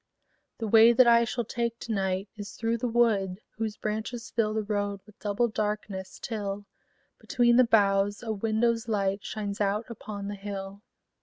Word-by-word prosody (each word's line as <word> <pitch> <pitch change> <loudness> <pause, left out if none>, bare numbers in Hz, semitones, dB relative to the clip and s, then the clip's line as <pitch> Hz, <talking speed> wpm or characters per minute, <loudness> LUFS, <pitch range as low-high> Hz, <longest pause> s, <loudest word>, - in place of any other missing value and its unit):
The 225 - -3
way 225 +2 +7
that 255 +2 +6
I 235 0 +6
shall 240 +1 -2
take 235 +1 -2
to 235 - -5
night 190 -1 -1
Is 205 -2 -8
through 230 0 -1
the 245 - -1
wood 215 -6 +2 0.2
whose 220 -1 -3
branches 220 +3 -4
fill 215 -2 0
The 220 - 0
road 205 -1 -2
with 210 - -19
double 210 +3 +1
darkness, 210 -3 -3
till, 205 -3 -4 0.5
Between 240 -1 +3
the 255 +1 +6
boughs, 205 -1 +2
a 225 - -2
window's 230 +2 0
light 200 -2 0
Shines 205 -1 -4
out 205 +3 +1
upon 205 -2 -7
the 205 - -4
hill. 200 0 -6
215 Hz, 170 wpm, -28 LUFS, 200-230 Hz, 0.5 s, way